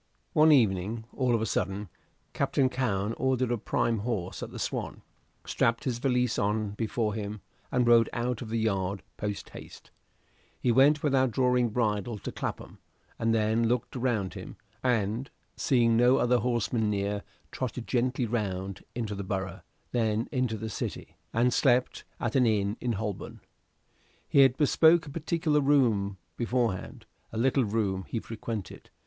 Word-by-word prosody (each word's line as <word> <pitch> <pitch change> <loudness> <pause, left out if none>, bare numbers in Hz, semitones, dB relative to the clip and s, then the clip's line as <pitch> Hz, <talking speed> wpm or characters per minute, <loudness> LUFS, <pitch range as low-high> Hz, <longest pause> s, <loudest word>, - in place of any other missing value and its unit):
One 155 +1 +6
evening, 110 -3 +2
all 125 -3 +1
of 110 - 0
a - - 0
sudden, 100 -1 -2 0.5
Captain 130 -2 +1
Cowen 110 -5 -1
ordered 130 -2 +1
a 120 - +1
prime 115 +1 0
horse 100 -5 -3
at - - -5
the - - -9
"Swan," - - -4 0.4
strapped 115 0 +1
his 120 -3 -2
valise 125 -2 +1
on 105 0 0
before 110 0 -1
him, 105 -1 -5 0.3
and 125 -1 +2
rode 120 -1 +5
out 120 0 -2
of 115 - -6
the 115 - -1
yard 100 -3 -1
post 105 -1 -4
haste: - - -12 0.7
he 125 - +2
went 140 +5 +5
without 135 -3 +3
drawing 125 0 +2
bridle 110 -1 -1
to - - -6
Clapham, - - -6 0.4
and 115 0 +1
then 110 +1 +2
looked 120 +2 -1
round 120 -7 -1
him, - - -8 0.3
and, 115 +1 0 0.3
seeing 120 -4 +3
no 125 +2 +5
other 125 0 +3
horseman 120 -2 0
near, 100 0 -1 0.3
trotted 125 -2 -4
gently 125 0 0
round 100 -4 -3
into 115 -3 -3
the 100 0 -4
Borough, 95 0 -4 0.3
then 115 -1 0
into 125 -5 0
the 110 +1 -5
City, - - -5 0.2
and 120 +2 +2
slept 125 +1 +2
at 120 +1 -2
an 125 -3 +4
inn 105 -2 +1
in 120 -1 0
Holborn. 105 -1 -5 0.9
He - - +3
had 135 -2 +6
bespoken 160 +1 +4
a - - -12
particular 160 -2 +1
room 115 -9 +2 0.2
beforehand. 120 -5 -1 0.3
a 110 - -6
little 130 +2 +2
room 100 -3 -1
he 115 - -2
frequented. 110 -2 -6
115 Hz, 155 wpm, -28 LUFS, 105-125 Hz, 0.9 s, One